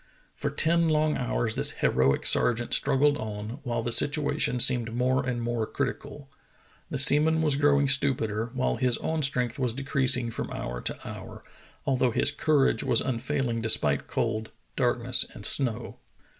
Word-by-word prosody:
For -, -, -4 dB
ten 165 Hz, +1 st, +2 dB
long 155 Hz, 0 st, +1 dB
hours 120 Hz, -3 st, -2 dB
this -, -, +1 dB
heroic 65 Hz, +1 st, 0 dB
sergeant 120 Hz, 0 st, +1 dB
struggled 145 Hz, +1 st, +2 dB
on, 110 Hz, +4 st, -7 dB
while 120 Hz, -3 st, -3 dB
the 120 Hz, -, -3 dB
situation 145 Hz, -2 st, +1 dB
seemed 120 Hz, -2 st, +2 dB
more 130 Hz, +2 st, 0 dB
and 125 Hz, -2 st, -3 dB
more 120 Hz, -2 st, -2 dB
critical. 145 Hz, -2 st, -5 dB, 0.6 s
The -, -, -4 dB
seaman 150 Hz, +4 st, +4 dB
was 150 Hz, -3 st, +1 dB
growing 145 Hz, 0 st, +2 dB
stupider, 120 Hz, -5 st, +1 dB
while 130 Hz, -, -1 dB
his 125 Hz, -2 st, +1 dB
own 160 Hz, 0 st, -3 dB
strength 125 Hz, -4 st, +2 dB
was 125 Hz, -3 st, -1 dB
decreasing 130 Hz, -3 st, +1 dB
from -, -, -5 dB
hour -, -, -6 dB
to -, -, -4 dB
hour, -, -, -10 dB, 0.4 s
although 130 Hz, -2 st, +1 dB
his 130 Hz, +5 st, +1 dB
courage 145 Hz, -1 st, +1 dB
was 125 Hz, -4 st, +2 dB
unfailing 130 Hz, -1 st, -2 dB
despite 75 Hz, -11 st, +1 dB
cold, 110 Hz, 0 st, -3 dB, 0.3 s
darkness, -, -, +1 dB
and -, -, -7 dB
snow. 120 Hz, -3 st, 0 dB
130 Hz, 155 wpm, -26 LUFS, 115-140 Hz, 0.6 s, seaman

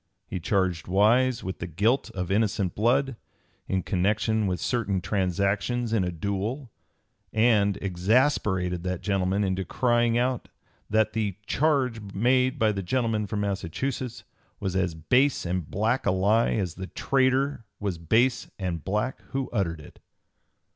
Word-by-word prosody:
He 95 Hz, -, -5 dB
charged 90 Hz, -2 st, 0 dB
Wise 115 Hz, +6 st, +3 dB
with 95 Hz, 0 st, -5 dB
the 85 Hz, -, -4 dB
guilt 110 Hz, -, +1 dB
of 90 Hz, -1 st, -3 dB
innocent 100 Hz, -3 st, +1 dB
blood, 130 Hz, +3 st, +1 dB, 0.5 s
in 95 Hz, -1 st, 0 dB
connection 105 Hz, +3 st, +1 dB
with 90 Hz, -2 st, -1 dB
certain 105 Hz, 0 st, 0 dB
transactions 100 Hz, +6 st, 0 dB
in 105 Hz, -4 st, +2 dB
a 90 Hz, -, -1 dB
duel, 100 Hz, -, -3 dB, 0.6 s
and 110 Hz, -3 st, +3 dB
exasperated 95 Hz, -2 st, +1 dB
that 90 Hz, 0 st, -3 dB
gentleman 100 Hz, 0 st, +1 dB
into 95 Hz, -1 st, -1 dB
crying 120 Hz, +2 st, +2 dB
out 125 Hz, 0 st, -1 dB, 0.4 s
that 110 Hz, +1 st, +2 dB
the 105 Hz, -4 st, -1 dB
"charge 130 Hz, -5 st, +1 dB
made 125 Hz, +4 st, +2 dB
by 110 Hz, -1 st, +3 dB
the 100 Hz, -2 st, -3 dB
gentleman 110 Hz, 0 st, 0 dB
from 105 Hz, +1 st, -2 dB
Massachusetts 110 Hz, +6 st, -3 dB, 0.4 s
was 95 Hz, -2 st, -3 dB
as 90 Hz, -3 st, 0 dB
base 125 Hz, -, +2 dB
and 90 Hz, -2 st, -2 dB
black 110 Hz, +5 st, 0 dB
a -, -, +4 dB
lie 100 Hz, +5 st, +2 dB
as 95 Hz, -6 st, -1 dB
the 95 Hz, +1 st, -7 dB
traitor 135 Hz, 0 st, +1 dB
was 100 Hz, -5 st, -3 dB
base 115 Hz, +9 st, +2 dB
and 90 Hz, -5 st, -3 dB
black 105 Hz, -, -2 dB
who 135 Hz, -1 st, -2 dB
uttered 85 Hz, -7 st, -1 dB
it." 75 Hz, -, -14 dB
105 Hz, 145 wpm, -26 LUFS, 95-120 Hz, 0.6 s, a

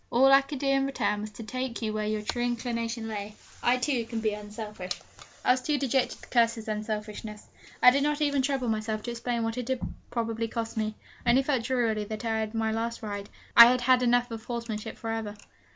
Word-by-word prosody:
All 260 Hz, +3 st, +5 dB
I 275 Hz, 0 st, +8 dB
could 280 Hz, +1 st, -6 dB
do 275 Hz, -, -4 dB
in 275 Hz, 0 st, +3 dB
return 210 Hz, -6 st, 0 dB
was 215 Hz, -, -5 dB
to 225 Hz, -, -8 dB
take 255 Hz, +2 st, -4 dB
you 215 Hz, -1 st, -1 dB
where 215 Hz, 0 st, -1 dB
your 215 Hz, 0 st, -1 dB
true 240 Hz, +3 st, -2 dB
inclination 235 Hz, -1 st, -2 dB
lay. 210 Hz, -1 st, -5 dB, 0.3 s
I, 245 Hz, +1 st, +3 dB
too, 250 Hz, -1 st, 0 dB
can 230 Hz, 0 st, -4 dB
be 215 Hz, -1 st, 0 dB
unselfish.' 210 Hz, -3 st, -6 dB, 0.5 s
I -, -, +6 dB
was 255 Hz, 0 st, +2 dB
too 295 Hz, +3 st, 0 dB
dejected 265 Hz, -1 st, 0 dB
to -, -, -12 dB
curse 230 Hz, -2 st, +3 dB
his 225 Hz, -1 st, -9 dB
unselfishness. 210 Hz, 0 st, -5 dB, 0.3 s
I 250 Hz, -, +10 dB
did 280 Hz, +2 st, +2 dB
not 295 Hz, +1 st, +1 dB
even 285 Hz, -2 st, +2 dB
trouble 265 Hz, -2 st, 0 dB
myself 215 Hz, -1 st, -1 dB
to 240 Hz, -, -3 dB
explain 235 Hz, 0 st, -2 dB
what 225 Hz, +2 st, -2 dB
it 245 Hz, -, -4 dB
had 260 Hz, -1 st, 0 dB, 0.3 s
probably 230 Hz, -1 st, -2 dB
cost 225 Hz, 0 st, -4 dB
me. 215 Hz, -1 st, -1 dB, 0.3 s
I 240 Hz, -, +1 dB
only 260 Hz, +3 st, +5 dB
felt 265 Hz, -4 st, 0 dB
drearily 230 Hz, -5 st, +1 dB
that 215 Hz, +2 st, -6 dB
I -, -, 0 dB
had 220 Hz, 0 st, +1 dB
had -, -, -17 dB
my 220 Hz, 0 st, +1 dB
last 230 Hz, +1 st, -3 dB
ride, 205 Hz, -1 st, -5 dB, 0.3 s
I 235 Hz, 0 st, +12 dB
had 250 Hz, 0 st, +3 dB
had 255 Hz, +1 st, +4 dB
enough 245 Hz, 0 st, +3 dB
of 225 Hz, -1 st, -6 dB
horsemanship 230 Hz, -2 st, -4 dB
for 225 Hz, -, -4 dB
ever! 220 Hz, -2 st, -3 dB
230 Hz, 230 wpm, -28 LUFS, 215-250 Hz, 0.5 s, I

